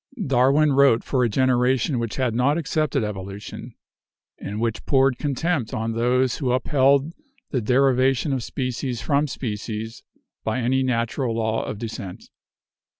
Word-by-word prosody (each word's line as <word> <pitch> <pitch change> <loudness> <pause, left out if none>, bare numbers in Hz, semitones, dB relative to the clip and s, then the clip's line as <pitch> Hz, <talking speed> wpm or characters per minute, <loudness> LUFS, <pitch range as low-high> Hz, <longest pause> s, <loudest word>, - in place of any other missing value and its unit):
Darwin 135 +3 +3
wrote 135 -4 +4
for 130 -2 0
a 120 - +2
generation 130 +2 +2
which 115 -2 -3
had 130 -4 0
not 130 +6 +2
accepted 155 -4 0
evolution, 100 -1 -7 0.6
and 105 +2 -5
which 115 -1 -2
poured 135 -2 +3
contempt 145 -2 -1
on 110 +1 -2
those 125 +2 +1
who 130 -4 0
upheld 140 +3 +2 0.4
the 130 - 0
derivation 130 +3 +2
of 130 - -1
species 125 0 -3
from 145 0 +1
species 110 -3 -5 0.4
by 110 - -1
any 130 +2 +1
natural 120 -1 -1
law 110 0 -1
of - - -5
descent. 110 -4 -7
125 Hz, 140 wpm, -23 LUFS, 115-135 Hz, 0.6 s, wrote